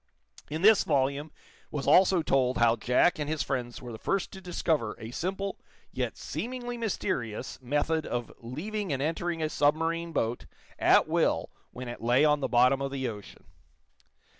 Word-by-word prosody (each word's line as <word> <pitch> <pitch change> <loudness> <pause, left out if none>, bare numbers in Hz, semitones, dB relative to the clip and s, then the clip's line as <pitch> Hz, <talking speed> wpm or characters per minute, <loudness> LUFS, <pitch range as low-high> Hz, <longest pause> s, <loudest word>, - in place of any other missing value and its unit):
In 155 +4 -4
this 215 -1 +7
volume 140 +3 0 0.4
was 145 -3 -4
also 185 -2 +5
told 130 -3 +2
how 115 -1 +4
Jack 125 +9 +2
and 150 0 -2
his 155 -1 0
friends 125 -2 -4
were 120 - -7
the 110 - -8
first 195 - -1
to 190 - -10
discover 160 - -1
a 110 +1 -8
simple, 195 +7 -3 0.3
yet - - -3
seemingly 245 0 -5
mysterious, 160 - -3
method 150 +5 0
of 120 -1 -3
leaving 180 - -4
and 135 - -1
entering 165 +1 -1
a - - +2
submarine 165 +3 +1
boat 120 -6 -2 0.3
at - - +5
will - - +1 0.2
when 125 0 -8
it 120 - -7
lay 120 +5 +4
on 150 -1 +3
the 140 - -1
bottom 125 +2 +4
of 135 - -1
the 135 -2 -2
ocean. 105 -3 -9
145 Hz, 165 wpm, -29 LUFS, 125-170 Hz, 0.4 s, this